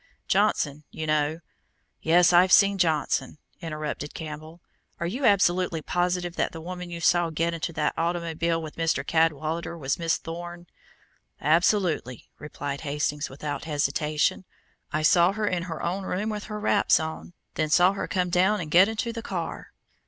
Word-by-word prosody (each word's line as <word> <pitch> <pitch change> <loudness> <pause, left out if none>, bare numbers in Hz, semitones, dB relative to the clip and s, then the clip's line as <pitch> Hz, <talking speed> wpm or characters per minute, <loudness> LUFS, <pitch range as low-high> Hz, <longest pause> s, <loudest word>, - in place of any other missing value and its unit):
Johnson, 145 +2 +1
you 160 - -5
know 155 +1 0 0.3
" - - -46 0.3
"Yes, 175 +2 +4
I've 180 +2 +5
seen 200 0 +5
Johnson," 155 -5 0 0.2
interrupted 155 -2 -5
Campbell. 155 +1 -8 0.4
"Are 170 - -2
you 245 +10 -2
absolutely 180 -5 +2
positive 175 0 -1
that - - 0
the 165 - -7
woman 180 +1 -7
you 170 -1 -6
saw 175 0 +3
get 165 +2 -1
into 165 0 -3
the 150 -2 -1
automobile 170 -1 -1
with 155 -2 -8
Mr. 165 -1 0
Cadwallader 160 +1 0
was 140 -1 -2
Miss 165 -1 +1
Thorne?" 175 +1 -8 0.7
"Absolutely," 165 - +1
replied 145 -1 -5
Hastings 150 0 -2
without 145 +3 -5
hesitation. 150 +2 0 0.5
"I 155 0 -1
saw 175 +3 +5
her 215 0 -2
in 180 -4 0
her 160 - -5
own 185 +3 -2
room 200 +5 -2
with 210 -1 -5
her 210 0 -6
wraps 210 -1 +3
on, 160 +2 -6 0.2
then 155 -1 -1
saw 180 +5 +5
her 200 - -4
come 180 -2 -1
down 190 +4 +3
and 155 -4 -6
get 185 +4 +7
into 225 +1 -3
the 230 - -5
car." 175 -6 -5
170 Hz, 165 wpm, -26 LUFS, 155-180 Hz, 0.7 s, get